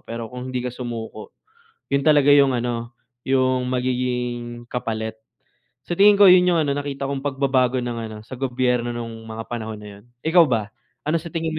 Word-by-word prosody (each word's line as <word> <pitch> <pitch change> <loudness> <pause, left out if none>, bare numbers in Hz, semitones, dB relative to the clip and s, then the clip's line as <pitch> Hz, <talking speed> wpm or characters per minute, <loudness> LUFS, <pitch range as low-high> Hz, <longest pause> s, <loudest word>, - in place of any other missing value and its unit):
pero 115 0 -5
kung 125 +1 -6
hindi 130 - -2
ka 125 - -2
sumuko 115 -3 -6 0.6
'yon 140 0 +1
talaga 145 -2 +5
'yong 140 -2 +6
ano, 120 0 -4 0.3
'yong 130 -1 +2
magiging 125 -1 -2
kapalit. 110 -2 -3 0.7
Sa 175 - -2
tingin 205 +1 +7
ko 200 -2 +9
yun 180 0 +6
yung 175 -2 +3
ano, 140 -1 0
nakita 140 -1 -4
kong 135 0 -4
pagbabago 130 -2 +1
ng 120 -1 -4
ano, 110 -1 -8
sa 130 +1 -9
gobyerno 125 -2 0
nung 115 -1 -7
mga 110 0 -6
panahon 110 -2 -5
na 105 - -9
yun. - - -25 0.2
Ikaw 170 +1 +6
ba, 110 -6 -1 0.3
ano 155 +2 0
sa 165 - -11
tingin 165 -1 -2
mo - - -3
125 Hz, 185 wpm, -22 LUFS, 120-140 Hz, 0.7 s, ko